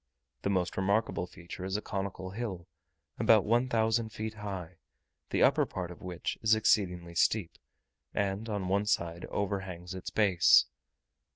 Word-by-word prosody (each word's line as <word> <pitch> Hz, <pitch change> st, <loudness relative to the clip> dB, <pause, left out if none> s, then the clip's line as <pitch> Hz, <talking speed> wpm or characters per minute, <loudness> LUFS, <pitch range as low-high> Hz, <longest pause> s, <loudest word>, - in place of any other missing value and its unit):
The -, -, -1 dB
most 95 Hz, -2 st, 0 dB
remarkable 100 Hz, -1 st, +1 dB
feature 90 Hz, +1 st, -9 dB
is 95 Hz, +2 st, -1 dB
a -, -, -4 dB
conical 95 Hz, -1 st, -4 dB
hill, 95 Hz, -5 st, -5 dB, 0.5 s
about -, -, +5 dB
one 120 Hz, +4 st, +2 dB
thousand 115 Hz, -1 st, +1 dB
feet 110 Hz, 0 st, -5 dB
high, 95 Hz, -5 st, -6 dB, 0.5 s
the -, -, +2 dB
upper -, -, +4 dB
part 90 Hz, -2 st, -5 dB
of 90 Hz, -, -12 dB
which 90 Hz, -2 st, -4 dB
is 110 Hz, 0 st, +5 dB
exceedingly 90 Hz, -6 st, +1 dB
steep, 90 Hz, +1 st, +1 dB, 0.5 s
and 100 Hz, +2 st, -2 dB
on 100 Hz, -3 st, -2 dB
one 100 Hz, +2 st, +1 dB
side 85 Hz, -4 st, 0 dB
overhangs 95 Hz, -3 st, -3 dB
its 95 Hz, -, -6 dB
base. 95 Hz, -5 st, +5 dB
95 Hz, 150 wpm, -31 LUFS, 90-105 Hz, 0.5 s, about